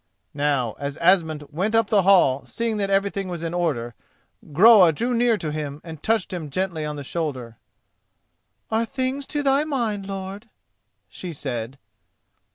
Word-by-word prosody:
Now 140 Hz, -6 st, 0 dB
as 140 Hz, +1 st, -4 dB
Asmund 165 Hz, -4 st, +2 dB
went 195 Hz, +9 st, -1 dB
up 225 Hz, -1 st, +2 dB
the 205 Hz, -2 st, +5 dB
hall 175 Hz, -9 st, +4 dB
seeing 230 Hz, -2 st, -2 dB
that 200 Hz, -1 st, -1 dB
everything 195 Hz, 0 st, 0 dB
was 175 Hz, -2 st, -5 dB
in 165 Hz, 0 st, -3 dB
order, 140 Hz, -10 st, -1 dB, 0.6 s
Groa 190 Hz, +2 st, +7 dB
drew 240 Hz, +9 st, -1 dB
near 235 Hz, -1 st, +3 dB
to 155 Hz, -6 st, -4 dB
him 150 Hz, -1 st, -5 dB
and 160 Hz, -3 st, -9 dB
touched 220 Hz, -4 st, 0 dB
him 165 Hz, -4 st, -5 dB
gently 170 Hz, 0 st, -2 dB
on 150 Hz, 0 st, -4 dB
the 145 Hz, -, -6 dB
shoulder. 130 Hz, -7 st, -4 dB, 1.1 s
"Are 220 Hz, +1 st, +2 dB
things 260 Hz, +3 st, -3 dB
to 295 Hz, -1 st, -2 dB
thy 275 Hz, +1 st, +3 dB
mind, 230 Hz, -10 st, -2 dB
lord?" 195 Hz, +3 st, -6 dB, 0.6 s
she 180 Hz, -, -7 dB
said. 130 Hz, -4 st, -5 dB
180 Hz, 160 wpm, -23 LUFS, 150-220 Hz, 1.1 s, Groa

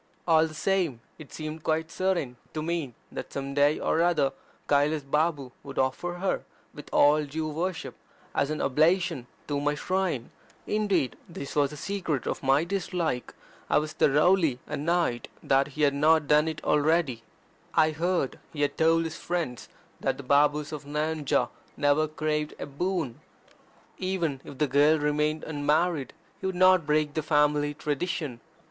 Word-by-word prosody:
All 160 Hz, -1 st, +5 dB
the 155 Hz, -, -11 dB
same, 175 Hz, -7 st, 0 dB, 0.2 s
it 155 Hz, -, -11 dB
seemed 155 Hz, 0 st, -6 dB
quite 160 Hz, +1 st, 0 dB
certain 180 Hz, -10 st, -1 dB, 0.2 s
to 155 Hz, -, -2 dB
me 160 Hz, -7 st, -2 dB, 0.2 s
that -, -, -6 dB
some 140 Hz, 0 st, -4 dB
day 145 Hz, +2 st, +3 dB
ox 165 Hz, -, +1 dB
other 155 Hz, -6 st, +2 dB, 0.3 s
Kailas 145 Hz, +1 st, +2 dB
Babu 150 Hz, -1 st, 0 dB
would 135 Hz, -1 st, -10 dB
offer 130 Hz, +7 st, 0 dB
her, 190 Hz, +2 st, -1 dB, 0.3 s
with 145 Hz, -, -11 dB
all 150 Hz, +1 st, +5 dB
due 155 Hz, +2 st, -3 dB
worship, 160 Hz, +2 st, -3 dB, 0.4 s
as 140 Hz, -, +1 dB
an 155 Hz, -, -2 dB
oblation 155 Hz, -1 st, +2 dB, 0.2 s
at 145 Hz, -, -2 dB
my 145 Hz, +1 st, 0 dB
shrine. 180 Hz, -6 st, -1 dB, 0.3 s
Indeed 205 Hz, -10 st, 0 dB
this 165 Hz, -5 st, -7 dB
was 145 Hz, -2 st, +3 dB
the 150 Hz, -, -9 dB
secret 170 Hz, -, -2 dB
of -, -, -3 dB
my 135 Hz, +3 st, +3 dB
dislike 175 Hz, -7 st, -2 dB, 0.3 s
I -, -, +4 dB
was 155 Hz, +1 st, -1 dB
thoroughly 150 Hz, -1 st, +3 dB
annoyed 150 Hz, -3 st, -1 dB
that 135 Hz, 0 st, +3 dB
he 150 Hz, -, +1 dB
had 140 Hz, -1 st, +4 dB
not 155 Hz, +2 st, +4 dB
done 150 Hz, +2 st, +4 dB
it 160 Hz, -1 st, -4 dB
already. 150 Hz, -4 st, +2 dB, 0.5 s
I 155 Hz, 0 st, +5 dB
heard 170 Hz, -2 st, -1 dB
he 145 Hz, -2 st, -2 dB
had 145 Hz, -, -1 dB
told 165 Hz, +1 st, +4 dB
his 165 Hz, -1 st, -5 dB
friends 170 Hz, -9 st, -3 dB, 0.3 s
that -, -, -1 dB
the 140 Hz, -, -8 dB
Babus 145 Hz, +2 st, +3 dB
of 150 Hz, -2 st, -6 dB
Nayanjore 150 Hz, 0 st, 0 dB, 0.3 s
never 145 Hz, +2 st, +3 dB
craved 150 Hz, 0 st, -2 dB
a -, -, -5 dB
boon. 155 Hz, -2 st, -2 dB, 0.8 s
Even 175 Hz, -8 st, -1 dB
if 140 Hz, -, -10 dB
the 150 Hz, -, +2 dB
girl 145 Hz, +3 st, +4 dB
remained 150 Hz, +1 st, 0 dB
unmarried, 150 Hz, -1 st, 0 dB, 0.3 s
he -, -, -3 dB
would 190 Hz, -, -2 dB
not 185 Hz, -3 st, +5 dB
break 150 Hz, -1 st, +2 dB
the 155 Hz, -, -1 dB
family 150 Hz, -1 st, +2 dB
tradition. 150 Hz, -4 st, -3 dB
150 Hz, 160 wpm, -27 LUFS, 145-165 Hz, 0.8 s, All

